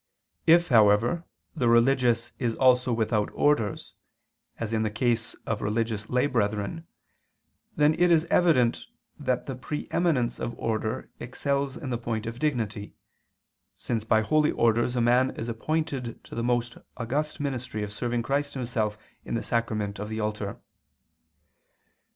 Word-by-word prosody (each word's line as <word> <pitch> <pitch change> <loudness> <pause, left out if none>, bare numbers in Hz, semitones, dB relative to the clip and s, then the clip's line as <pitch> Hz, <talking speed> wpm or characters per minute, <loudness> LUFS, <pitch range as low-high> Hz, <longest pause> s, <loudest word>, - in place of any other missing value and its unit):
If, 170 +1 +6
however, 115 +7 +4 0.3
the 125 -7 +2
religious 120 -1 +3
is 120 -3 0
also 125 -1 +4
without 110 -2 +1
orders, 115 -9 +1 0.6
as 115 -1 -4
in 110 - +1
the 110 - +1
case 115 +1 0
of 115 -2 -2
religious 110 0 -1
lay 125 +2 +2
brethren, 115 +5 -1 0.9
then 150 +1 +4
it 175 +2 +3
is 165 -1 +4
evident 150 -10 +3 0.3
that 125 -1 -1
the 135 - -4
pre 150 +4 -5
eminence 155 -9 +1
of 120 - -4
order 110 +2 -2
excels 140 +2 -2
in 130 -5 -5
the 120 - -1
point 115 -2 -3
of 115 +1 -6
dignity, 115 -8 -2 0.8
since 115 -3 -2
by 110 0 +3
holy 150 +6 +2
orders 120 +2 +2
a 120 - +1
man 125 +2 +3
is 115 - -5
appointed 135 0 -3
to - - -13
the 115 - -2
most 120 0 0 0.2
august 140 +6 -2
ministry 130 -6 -3
of 105 0 -5
serving 120 +2 -2
Christ 145 +3 -1
Himself 115 -5 -1 0.3
in - - -4
the 115 - -2
sacrament 110 -4 -1
of 105 +1 -5
the 110 0 -4
altar. 105 -2 -3
120 Hz, 150 wpm, -27 LUFS, 110-135 Hz, 0.9 s, If